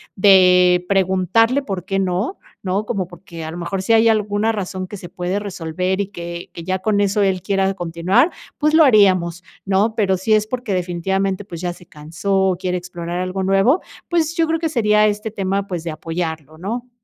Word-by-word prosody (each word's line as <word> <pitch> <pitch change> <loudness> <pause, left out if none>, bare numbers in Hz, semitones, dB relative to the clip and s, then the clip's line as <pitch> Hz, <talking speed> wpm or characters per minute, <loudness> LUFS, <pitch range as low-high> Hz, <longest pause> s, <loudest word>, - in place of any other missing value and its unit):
de 180 -2 +5
preguntarle 195 - +2
por 195 -8 -5
qué 195 0 -1
no, 190 - -1 0.2
¿no? 190 +2 -1
Como, 195 -6 -2
por 175 +1 -15
que 170 -4 -9
a 160 - -5
lo 170 - -7
mejor 185 +2 -3
si 225 - +2
hay 225 0 +5
alguna 215 0 +1
razón 185 -2 -4
que 205 - -8
se 180 - -9
puede 180 +2 -3
resolver 185 -1 -2
y 200 - -3
que 170 -2 -7
que 170 - -9
ya 185 +2 -1
con 205 +1 +1
eso 205 +1 +1
él 190 -2 +1
quiera 195 0 +1
continuar, 180 - +1 0.3
pues 305 +1 +1
lo 320 - +7
haríamos, 190 - +4 0.3
¿no? 200 +3 +2
Pero 195 -4 +2
si 190 +5 -3
es 215 0 +2
porque 245 -3 -3
definitivamente, 190 +2 -1
pues, 170 -4 -8
ya 175 -1 -2
se 175 - -17
cansó, 180 +6 -1
quiere 180 -1 -1
explorar 175 -1 -5
algo 185 +1 -2
nuevo, 195 - +3 0.3
pues, 330 -2 +1
yo 330 -2 +2
creo 325 0 0
que 325 -1 -1
sería 210 -6 +3
este 210 +1 -2
tema, 195 -1 -2
pues, 175 -4 -4
de 170 - -4
apoyarlo, 160 -1 -5
¿no? 235 +8 -5
190 Hz, 200 wpm, -19 LUFS, 180-210 Hz, 0.3 s, lo